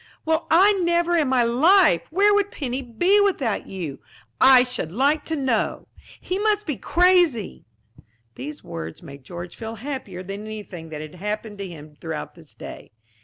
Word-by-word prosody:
Well, 320 +1 0
I 385 +6 +6
never 345 0 +2
in 310 -4 +2
my 255 -2 +3
life! 275 - +4
Where 400 +5 +4
would 405 -1 +2
Penny 265 -6 -4
be 350 - +2
without 280 - 0
you, 170 -8 -6 0.6
I 250 - +6
should 250 -10 -4
like 280 - +1
to 320 - -2
know! 260 -7 -1 0.3
He 370 +2 -3
must 420 0 +1
be 300 - -2
crazy." 345 - +2 0.7
These 295 - -8
words 80 - -7
made 140 -4 -11
George 175 +4 -8
feel 225 -1 -6
happier 225 -7 -6
than 195 +2 -6
anything 205 -6 -8
that 150 -1 -6
had 155 0 -9
happened 210 +3 -5
to 200 - -4
him 150 -3 -12
throughout 160 -2 -5
this - - -18
day. - - -10
245 Hz, 170 wpm, -23 LUFS, -, 0.7 s, I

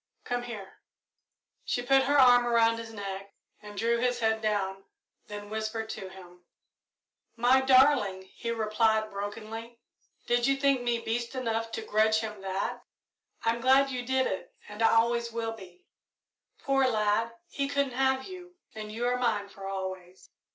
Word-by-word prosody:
"Come 245 0 -2
here." 220 -5 -9 0.8
She 245 - -2
put 270 +1 +4
her 290 +2 +3
arm 245 -2 +6
around 230 -1 +3
his 225 -1 -8
neck 195 -2 -7 0.3
and 210 -1 -11
drew 235 +2 +1
his 245 0 0
head 220 -1 +1
down, 195 -3 -1 0.4
then 205 -1 -7
whispered 220 0 -3
to 190 - -7
him. 180 -2 -14 0.9
"My 245 +3 +4
darling!" 255 -8 +4
he 235 - -5
replied, 220 -1 +1
brokenly, 220 +3 -6 0.5
"did 240 0 +2
you 275 - +3
think 275 -2 +2
me 240 -1 0
beast 235 +2 -3
enough 225 -3 -2
to 225 - -3
grudge 220 0 +2
him 210 -3 -6
that? 195 0 -3 0.7
I'm 230 +1 +1
glad 270 +2 +4
you 250 -1 -3
did 260 +1 +1
it 190 - -4
and 210 +2 -8
I 225 - +6
always 235 +1 +2
will 225 0 -3
be. 185 -5 -14 0.8
Poor 270 -1 +3
lad, 220 0 +1
he 280 -1 -2
couldn't 280 -2 0
have 265 +1 +1
you, 360 0 -10 0.2
and 215 -1 -7
you 230 +3 -3
are 250 0 +1
mine 215 -5 0
for 195 -1 -9
always." 185 -1 -6
225 Hz, 160 wpm, -29 LUFS, 210-245 Hz, 0.9 s, arm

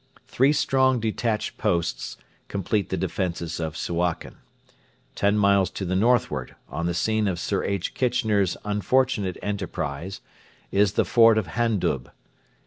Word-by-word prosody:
Three 135 +3 +3
strong 130 -3 +2
detached 110 0 -2
posts 85 -1 -1 0.3
complete 100 0 -1
the - - -1
defences 85 -3 -3
of 80 -1 -3
Suakin. 85 0 -2 0.8
Ten 100 +1 +2
miles 100 -2 +4
to 95 - -5
the 95 +1 -1
northward, 120 +5 +1
on 85 +1 -3
the 85 - -1
scene 110 +4 +1
of 90 -3 -1
Sir 100 +1 -1
H. 100 -2 -2
Kitchener's 110 -7 +1
unfortunate 105 -1 +1
enterprise, 95 -3 -4 0.5
is 100 0 +3
the - - +2
fort 115 -2 +5
of 100 -6 -1
Handub. 100 - 0
100 Hz, 135 wpm, -25 LUFS, 85-110 Hz, 0.8 s, fort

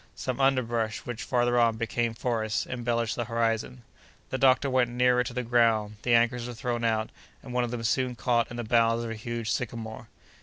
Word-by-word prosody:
Some 130 +1 -3
underbrush, 120 -5 +1
which, 120 -2 -5
farther 120 0 +1
on, 115 -2 +3
became 115 +1 -1
forests, 110 -3 -1
embellished 120 -2 -1
the 120 - -2
horizon. 115 +1 -1 0.5
The 130 - -2
doctor 135 +1 +4
went 130 -2 +2
nearer 125 0 +3
to 125 - -5
the 125 - -1
ground; 115 -3 +2
the 120 -1 +3
anchors 120 +1 +2
were 120 - -7
thrown 120 -1 -2
out, 110 -1 0 0.3
and 125 - -8
one 125 0 +1
of 120 - -2
them 115 -1 -4
soon 125 +2 0
caught 120 -1 +1
in 120 - -7
the 120 - -3
boughs 115 0 +2
of 115 - -4
a - - -4
huge 115 +1 -4
sycamore. 115 -2 -4
120 Hz, 200 wpm, -27 LUFS, 115-125 Hz, 0.5 s, doctor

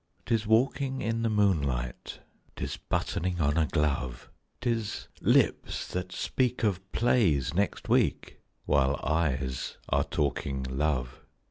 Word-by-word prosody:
'Tis 115 -3 0
walking 130 +4 +2
in 115 +2 -1
the 115 - +1
moonlight, 70 - 0 0.3
'Tis - - -3
buttoning 90 0 -2
on 75 -2 +2
a 80 -2 +2
glove, 70 -4 -1 0.3
'Tis 115 -3 -2
lips - - +2
that 90 0 -4
speak 125 +3 -1
of 95 -3 -1
plays 95 - +2
next 100 +4 -1
week, - - +1 0.3
While 70 0 +3
eyes 70 -4 -1
are 70 +1 +3
talking 70 -2 -1
love. 65 -1 -1
80 Hz, 120 wpm, -29 LUFS, 70-110 Hz, 0.3 s, While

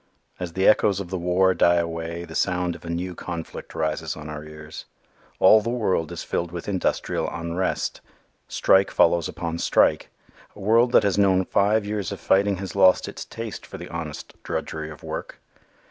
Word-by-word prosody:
As 90 -2 -5
the 95 +2 +2
echoes 100 -2 +4
of 95 -2 -6
the 95 - -1
war 90 +2 +3
die 85 -1 +4
away 85 0 -3
the 80 - -11
sound 90 0 0
of - - -13
a 85 - -7
new 90 +2 -3
conflict 85 -2 -7
rises 80 0 -2
on 75 0 -8
our 75 0 -6
ears. 75 0 -10 0.5
All 110 - +7
the 115 - -3
world 100 -9 0
is - - -5
filled 85 -1 -2
with 85 -1 -7
industrial 95 -3 -1
unrest. 85 +2 -2 0.5
Strike 95 0 +3
follows 85 -1 +3
upon 85 -2 -4
strike. - - +2 0.5
A - - -13
world 115 +4 +3
that - - +6
has 100 -1 +1
known 95 -2 +3
five 105 +3 +2
years 105 -2 -3
of - - -5
fighting 100 +1 +2
has 95 +1 -6
lost 95 -2 +5
its - - -7
taste - - -7
for - - -9
the - - -9
honest 80 -3 -6
drudgery 80 -1 -4
of 75 - -12
work. - - -6
90 Hz, 185 wpm, -24 LUFS, 85-100 Hz, 0.5 s, All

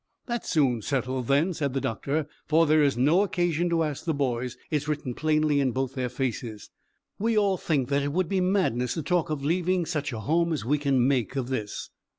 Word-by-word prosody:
"That's 240 -2 -3
soon 135 -8 +2
settled, 130 0 -2
then," 150 +7 +2
said 140 -5 -2
the - - +2
doctor, 140 +6 -2 0.2
"for 160 +1 +4
there 155 0 +4
is 140 -4 +2
no 150 +9 +4
occasion 175 -3 0
to 165 -1 +2
ask 150 -3 -3
the 160 -3 -1
boys 125 -2 -2
it's 150 -1 -1
written 145 -4 -2
plainly 155 0 +2
in 130 -3 +1
both 130 0 -2
their 125 -2 -2
faces. 120 -4 -4 0.5
We 225 +1 +1
all 200 -2 +3
think 145 -7 -1
that 140 0 +2
it 145 0 -1
would 180 +3 0
be 190 +1 0
madness 180 - +1
to 160 - -3
talk 175 0 0
of 145 -2 -3
leaving 180 +2 +1
such 150 -4 -2
a 110 -2 -5
home 165 +8 +1
as 150 - -3
we 145 +4 +1
can 135 -3 +2
make 130 -3 0
of 130 -2 -2
this." 110 -6 -4
145 Hz, 215 wpm, -26 LUFS, 130-165 Hz, 0.5 s, for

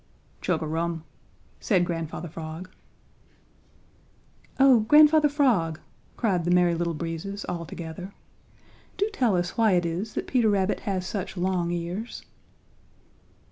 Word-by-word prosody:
"Chug - - 0
a - - -2
rum," 165 +1 -2 0.6
said 185 -5 +2
Grandfather 165 0 -4
Frog. 165 +3 -8 1.9
"Oh, 265 -3 +7
Grandfather 300 +6 +6
Frog," 225 - +1 0.4
cried 190 -7 +1
the 175 - -1
Merry 175 -1 +4
Little 170 0 -1
Breezes 170 +5 -5
all 170 -2 -4
together, 170 +5 -7 0.9
"do 405 - +1
tell 240 - +2
us 175 0 -2
why 220 -3 +4
it 175 -1 +2
is 180 +6 -3
that - - -2
Peter 240 -4 +2
Rabbit 195 -1 +1
has 185 -2 -1
such 190 0 -4
long 180 -1 0
ears." 175 +6 -4
180 Hz, 130 wpm, -26 LUFS, 170-215 Hz, 1.9 s, Oh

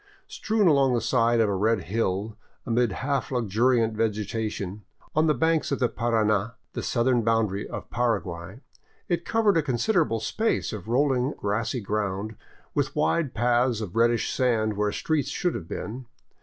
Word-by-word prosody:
Strewn 220 - +1
along 135 -5 +4
the - - +2
side 115 0 +2
of 110 - +4
a 100 - 0
red 105 +2 +1
hill, 105 +1 -2 0.3
amid 120 -2 +1
half 140 +6 -2
luxuriant 115 0 +2
vegetation, 105 -2 -2 0.3
on 155 +1 +3
the 150 - +3
banks 160 -2 +1
of 140 - +1
the 125 -3 +1
Parana, 110 -2 0 0.2
the - - -3
southern 120 0 +1
boundary 110 -3 0
of - - -6
Paraguay, 105 -4 -2 0.5
it 175 -1 -1
covered 220 -5 +2
a - - +4
considerable 150 - +1
space 220 - -1
of 105 -1 -7
rolling, 130 +2 +1
grassy 115 +4 -1
ground, 105 +1 -2 0.4
with - - -1
wide 135 - +1
paths 120 0 +2
of 105 -4 -6
reddish 115 0 +2
sand 110 -5 +1
where 105 0 0
streets 155 +6 -1
should 175 -2 -1
have 80 - -6
been. 120 +7 -6
115 Hz, 155 wpm, -26 LUFS, 105-130 Hz, 0.5 s, along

